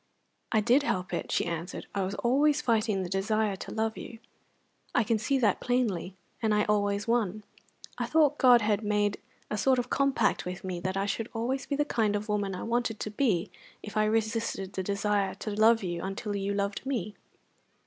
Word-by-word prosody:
"I 220 - +3
did 245 +6 +4
help 185 -10 -2
it," - - -3
she - - +1
answered. 170 +1 -4
"I 200 - -1
was 190 +1 -2
always 285 +5 +3
fighting 220 -7 +1
the - - -4
desire 205 +2 0
to - - -8
love 220 0 -1
you, 230 - -8 0.8
I 245 - +4
can 220 +1 +1
see 275 +5 +1
that 220 -7 +2
plainly, 220 -8 -1 0.3
and 220 -2 +2
I 210 - +3
always 205 0 0
won. 215 -3 0 0.6
I - - -1
thought 300 -2 +3
God 245 -2 +7
had 210 0 +1
made 205 -1 +1 0.3
a 210 - -1
sort 265 -1 +3
of 245 0 -2
compact 275 -1 +2
with 180 0 -6
me 185 -2 -3
that 185 +2 -2
I 195 - 0
should 215 +3 -2
always 255 +4 -2
be 285 - -1
the 295 +1 +1
kind 220 -7 +1
of 210 +1 -3
woman 205 -2 -1
I - - -5
wanted 235 -1 -1
to 215 - -4
be 210 -6 0 0.3
if 210 - -8
I 215 0 +3
resisted 220 -3 -1
the 190 - -2
desire 200 0 0
to 215 - -5
love 220 +2 +4
you 175 -2 -3
until 200 +2 -4
you 200 0 -1
loved 200 0 -2
me." 235 -7 -2
215 Hz, 200 wpm, -29 LUFS, 200-235 Hz, 0.8 s, God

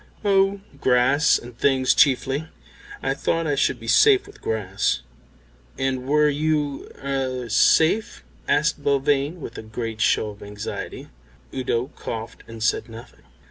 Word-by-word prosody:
"Oh, 195 0 +3 0.2
grass 130 +5 +3
and 120 0 -11
things 130 +1 +2
chiefly. 140 +2 +2 0.6
I - - +1
thought 165 0 -1
I 150 - 0
should 135 -3 +1
be 115 - -10
safe 405 - +5
with 410 - -16
grass." 95 - -1 0.7
"And 130 -1 -2
were 150 +1 +4
you 150 -1 -1
er 130 -3 -2
safe?" 160 - +3 0.2
asked 150 -1 +1
Belvane, 140 +3 +1
with 120 - -8
a - - -5
great 110 0 -5
show 105 - +2
of 105 - -15
anxiety. 105 +1 -7 0.4
Udo 125 0 -2
coughed 110 0 -6
and 115 -1 -7
said 115 - 0
nothing. 115 +1 -12
135 Hz, 140 wpm, -23 LUFS, 115-150 Hz, 0.7 s, safe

